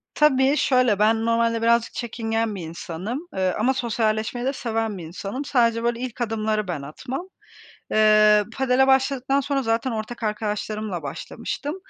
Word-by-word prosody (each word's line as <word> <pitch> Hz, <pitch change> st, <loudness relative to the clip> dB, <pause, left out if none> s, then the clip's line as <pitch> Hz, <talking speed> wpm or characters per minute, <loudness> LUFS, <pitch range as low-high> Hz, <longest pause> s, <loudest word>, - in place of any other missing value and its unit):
Tabii, 275 Hz, -1 st, +4 dB
şöyle, 250 Hz, -8 st, +3 dB
ben 225 Hz, +1 st, +3 dB
normalde 230 Hz, 0 st, +1 dB
birazcık 235 Hz, 0 st, +2 dB
çekingen 225 Hz, -2 st, -2 dB
bir 190 Hz, -, -6 dB
insanım, 175 Hz, -, -5 dB, 0.2 s
eee, 185 Hz, -1 st, +1 dB
ama 250 Hz, +5 st, +3 dB
sosyalleşmeyi 230 Hz, -1 st, -1 dB
de 270 Hz, -, 0 dB
seven 225 Hz, -5 st, -2 dB
bir 175 Hz, -, -7 dB
insanım. 195 Hz, -, -6 dB
Sadece 230 Hz, -4 st, +2 dB
böyle 235 Hz, 0 st, 0 dB
ilk 250 Hz, -1 st, -5 dB
adımları 215 Hz, -2 st, -1 dB
ben 170 Hz, -6 st, -3 dB
atmam. 260 Hz, -, -6 dB, 0.6 s
Eee, 215 Hz, -1 st, +5 dB
padel 265 Hz, 0 st, +3 dB
başladıktan 270 Hz, 0 st, +2 dB
sonra 275 Hz, 0 st, -1 dB
zaten 225 Hz, +2 st, 0 dB
ortak 225 Hz, +1 st, -5 dB
arkadaşlarımla 210 Hz, -3 st, -3 dB
başlamıştım 230 Hz, -, -5 dB
230 Hz, 145 wpm, -23 LUFS, 215-255 Hz, 0.6 s, Eee